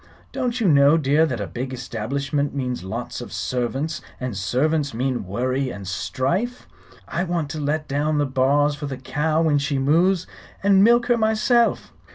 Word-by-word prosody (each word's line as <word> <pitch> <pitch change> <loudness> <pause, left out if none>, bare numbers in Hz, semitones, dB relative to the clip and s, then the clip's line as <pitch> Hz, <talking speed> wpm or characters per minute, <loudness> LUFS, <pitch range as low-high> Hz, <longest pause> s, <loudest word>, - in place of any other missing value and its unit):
Don't 250 -2 -2
you 220 - +2
know, 145 0 +6
dear, 150 +2 +3
that 125 -6 -3
a 100 - -2
big 120 +10 -5
establishment 135 +4 -3
means 125 -6 -3
lots 95 - -5
of - - -8
servants, 130 +5 -2 0.2
and 125 -4 -4
servants 140 +8 0
mean 125 -2 -1
worry 130 +6 -1
and 100 -5 -8
strife? 175 - -2 0.4
I 175 - -2
want 170 -5 -2
to 155 - -5
let 150 +1 -1
down 150 +2 0
the 145 - +2
bars 140 +2 +2
for 145 0 -6
the 135 -2 -5
cow 155 +5 0
when 150 -3 +3
she 140 0 -1
moos, 170 +7 +2 0.4
and 195 -1 +5
milk 235 +2 +5
her 240 -1 +2
myself." 225 +2 +2
145 Hz, 175 wpm, -22 LUFS, 130-165 Hz, 0.4 s, know